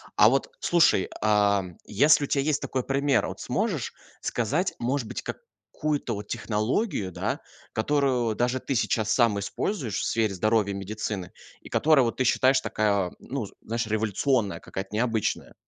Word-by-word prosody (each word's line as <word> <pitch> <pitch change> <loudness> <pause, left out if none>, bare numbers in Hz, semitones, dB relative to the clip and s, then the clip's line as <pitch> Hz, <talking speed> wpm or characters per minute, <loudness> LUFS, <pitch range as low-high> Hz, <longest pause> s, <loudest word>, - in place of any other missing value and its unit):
А - - +7
вот, - - 0
слушай, 170 - +3
а, 105 -2 +3 0.2
если 145 +7 +4
у - - -9
тебя 140 0 +1
есть 150 0 0
такой 130 -1 -2
пример, 140 +1 +1
вот - - -7
сможешь - - -1 0.3
сказать, 145 - 0
может 125 0 -1
быть, - - -5
какую-то 150 - -4
вот 100 0 -7
технологию, 110 - -1
да, - - -2 0.3
которую 125 -2 +1
даже 125 +3 0
ты 135 - -3
сейчас 110 -2 +1
сам 115 -4 +3
используешь 115 - -2
в - - -2
сфере 110 -3 +1
здоровья 105 +2 +1
и - - -5
медицины, 100 -2 -4 0.3
и - - -12
которая, 150 -3 +4
вот, 115 - -2
ты 130 - +2
считаешь, 130 +2 +4
такая, 100 -4 0
ну, 135 -4 -4 0.2
знаешь, 115 0 -3
революционная 110 +1 0
какая-то, 95 0 -6
необычная? 110 -1 -1
115 Hz, 155 wpm, -26 LUFS, 105-135 Hz, 0.3 s, А